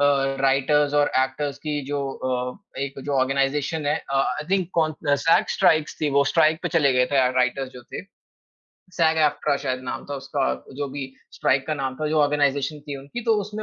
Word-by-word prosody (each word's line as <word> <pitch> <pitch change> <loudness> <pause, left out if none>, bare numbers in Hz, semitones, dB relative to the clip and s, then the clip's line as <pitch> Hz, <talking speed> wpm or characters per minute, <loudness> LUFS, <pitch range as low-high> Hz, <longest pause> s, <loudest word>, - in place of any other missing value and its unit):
अ, - - +4 0.4
writers 140 +2 +2
और 145 0 +3
actors 135 +2 -1
की 150 -1 -3
जो 145 0 -2
अ, 130 +8 -4
एक 140 0 -4
जो 145 - -2
ऑर्गनाइज़ेशन 140 +3 0
है, 150 - +2
अ, - - -1
I 150 +2 -1
think 190 -3 +1
cone 155 -2 +1 0.2
a, - - +7
sag 165 - +4
strikes 155 -1 +3
थी 150 -2 +1
वो 140 - +4
स्ट्राइक 160 -1 +3
पे - - -1
चले 140 -3 +3
गए 125 0 +3
थे - - +3
अ, - - +3
राइटर्स 130 +1 +1
जो 125 - -11
थे - - -5 0.9
सैग-एफ़्ट्रा 160 -4 +2
शायद 130 -1 -1
नाम - - -5
था - - -2
उसका 135 - -2 0.3
जो 145 0 -2
भी 135 0 -5 0.3
स्ट्राइक 135 0 +1
का 155 - -1
नाम 135 -2 -3
था, 155 - -2
जो 155 +1 +1
ऑर्गनाइज़ेशन 145 0 +1
थी 145 -1 -6
उनकी, 140 - -7
तो 225 - +3
उसमें 210 +2 -6
145 Hz, 205 wpm, -23 LUFS, 135-155 Hz, 0.9 s, अ